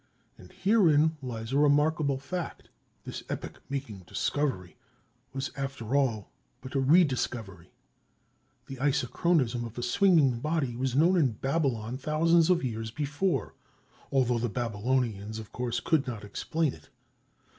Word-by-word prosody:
And 90 Hz, -, -15 dB
herein 165 Hz, -7 st, +3 dB
lies 115 Hz, -2 st, -5 dB
a 140 Hz, -, +3 dB
remarkable 145 Hz, -1 st, +3 dB
fact—this 170 Hz, +5 st, -7 dB
epoch -, -, -6 dB
making 135 Hz, -7 st, -4 dB
discovery 130 Hz, -12 st, -2 dB, 0.6 s
was 135 Hz, +1 st, -4 dB
after 135 Hz, -3 st, -3 dB
all 120 Hz, -8 st, 0 dB, 0.3 s
but 130 Hz, +1 st, -10 dB
a 140 Hz, -, +1 dB
rediscovery. 125 Hz, -, +1 dB, 0.9 s
The 135 Hz, -, -8 dB
isochronism 130 Hz, -1 st, +1 dB
of 115 Hz, 0 st, -8 dB
a 120 Hz, -, -3 dB
swinging 140 Hz, -3 st, +4 dB
body 150 Hz, -3 st, -1 dB
was 130 Hz, 0 st, -1 dB
known 170 Hz, +6 st, +4 dB
in 135 Hz, -8 st, +3 dB
Babylon 130 Hz, -3 st, -1 dB
thousands 165 Hz, +3 st, +3 dB
of 180 Hz, -4 st, +3 dB
years 115 Hz, -3 st, -3 dB
before, 145 Hz, -, -1 dB, 0.6 s
although 125 Hz, -3 st, +2 dB
the 120 Hz, +1 st, -1 dB
Babylonians, 110 Hz, -1 st, -1 dB
of 110 Hz, -2 st, -9 dB
course, 125 Hz, -2 st, -2 dB
could 155 Hz, -5 st, +1 dB
not 115 Hz, -4 st, -5 dB
explain 150 Hz, +9 st, -1 dB
it. -, -, -16 dB
135 Hz, 130 wpm, -29 LUFS, 115-150 Hz, 0.9 s, swinging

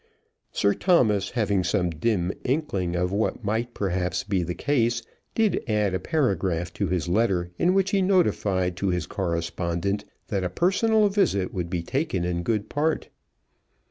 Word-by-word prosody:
Sir 100 Hz, -, +2 dB
Thomas, 110 Hz, -, +3 dB
having 100 Hz, -5 st, +1 dB
some 90 Hz, -1 st, +1 dB
dim 90 Hz, +1 st, 0 dB
inkling 100 Hz, -, -1 dB
of 90 Hz, +1 st, 0 dB
what 105 Hz, +3 st, 0 dB, 0.4 s
perhaps 90 Hz, -2 st, -1 dB
might 100 Hz, -, -24 dB
be 95 Hz, -2 st, +2 dB
the 85 Hz, 0 st, -3 dB
case, 120 Hz, -4 st, +1 dB, 0.3 s
did 220 Hz, -3 st, +2 dB
add 105 Hz, -4 st, +1 dB
a 95 Hz, -, 0 dB
paragraph 95 Hz, -, 0 dB
to 100 Hz, -, -1 dB
his 90 Hz, 0 st, -1 dB
letter 90 Hz, -2 st, +1 dB
in 180 Hz, +2 st, +3 dB
which 195 Hz, 0 st, +2 dB
he 200 Hz, -, +2 dB
notified 100 Hz, -, +2 dB
to 100 Hz, -, -1 dB
his 90 Hz, -3 st, 0 dB
correspondent 85 Hz, +2 st, -2 dB, 0.2 s
that 100 Hz, -3 st, -1 dB
a 90 Hz, -, -1 dB
personal 205 Hz, -, +3 dB
visit 190 Hz, -, +1 dB
would 90 Hz, -3 st, -3 dB
be 85 Hz, -2 st, -2 dB
taken 115 Hz, -, -1 dB
in 85 Hz, -1 st, -1 dB
good 105 Hz, +3 st, -1 dB
part. 155 Hz, +2 st, -1 dB
100 Hz, 160 wpm, -25 LUFS, 90-130 Hz, 0.4 s, Thomas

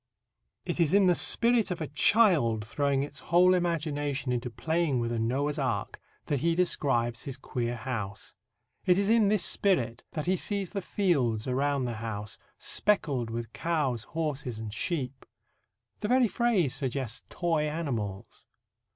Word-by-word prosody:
It -, -, -3 dB
is 170 Hz, +1 st, +3 dB
in 200 Hz, -1 st, +5 dB
the 180 Hz, -, +5 dB
spirit 235 Hz, +5 st, +3 dB
of 180 Hz, -, -3 dB
a 160 Hz, -, -2 dB
child 150 Hz, -, +3 dB
throwing 140 Hz, +3 st, 0 dB
its 145 Hz, -, -6 dB
whole 180 Hz, +2 st, +4 dB
imagination 150 Hz, -6 st, -1 dB
into 125 Hz, 0 st, -2 dB
playing 160 Hz, +2 st, 0 dB
with 115 Hz, 0 st, -1 dB
a 115 Hz, -, -1 dB
Noah's 140 Hz, +6 st, 0 dB
Ark 120 Hz, -7 st, -2 dB, 0.3 s
that 145 Hz, -, -1 dB
he 165 Hz, +3 st, +1 dB
describes 120 Hz, -9 st, +1 dB
his 135 Hz, -1 st, -4 dB
queer 120 Hz, -2 st, -3 dB
house. 110 Hz, -5 st, -5 dB, 0.5 s
It 180 Hz, 0 st, +4 dB
is 200 Hz, +1 st, +1 dB
in 225 Hz, -2 st, +4 dB
this 200 Hz, -3 st, +3 dB
spirit 125 Hz, -, +1 dB
that 155 Hz, -, -3 dB
he 185 Hz, +1 st, +1 dB
sees 200 Hz, -2 st, -2 dB
the 200 Hz, -, -3 dB
fields 135 Hz, -, 0 dB
around 135 Hz, +1 st, 0 dB
his 120 Hz, -2 st, -3 dB
house 105 Hz, -2 st, -5 dB, 0.2 s
"speckled 140 Hz, -, 0 dB
with 115 Hz, 0 st, -5 dB
cows, 145 Hz, -9 st, -1 dB
horses 150 Hz, -7 st, -3 dB
and 110 Hz, -1 st, -6 dB
sheep." 135 Hz, -3 st, -3 dB, 0.8 s
The 210 Hz, -, -2 dB
very 250 Hz, +1 st, +4 dB
phrase 210 Hz, -, +1 dB
suggests 130 Hz, -4 st, -2 dB
toy 160 Hz, -3 st, 0 dB
animals. 120 Hz, -, -4 dB
145 Hz, 155 wpm, -29 LUFS, 120-175 Hz, 0.8 s, in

